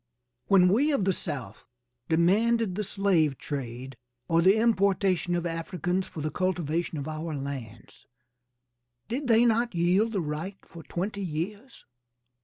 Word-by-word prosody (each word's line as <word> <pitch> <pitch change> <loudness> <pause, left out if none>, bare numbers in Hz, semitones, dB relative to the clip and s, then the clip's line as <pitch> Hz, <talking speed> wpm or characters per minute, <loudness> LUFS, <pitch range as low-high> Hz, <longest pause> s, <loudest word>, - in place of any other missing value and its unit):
When 190 -2 +6
we 270 +11 +3
of 210 -9 +1
the 190 - +2
South 135 - -6 0.5
demanded 205 +6 +3
the 210 +3 -2
slave 180 -9 +1
trade, 130 -1 -6 0.3
or 165 0 +3
the 190 +4 +5
importation 195 -5 +2
of 175 0 -2
Africans 175 +2 -2
for 155 - -7
the 155 +1 -2
cultivation 170 -2 -1
of 140 +1 -4
our 155 0 -4
lands, 130 -6 -8 1.0
did 265 +4 -3
they 230 0 +5
not 235 -2 +1
yield 185 +7 +2
the 200 - 0
right 160 +6 -4
for 170 - -11
twenty 195 +5 -4
years? 195 - -5
180 Hz, 140 wpm, -27 LUFS, 155-200 Hz, 1.0 s, When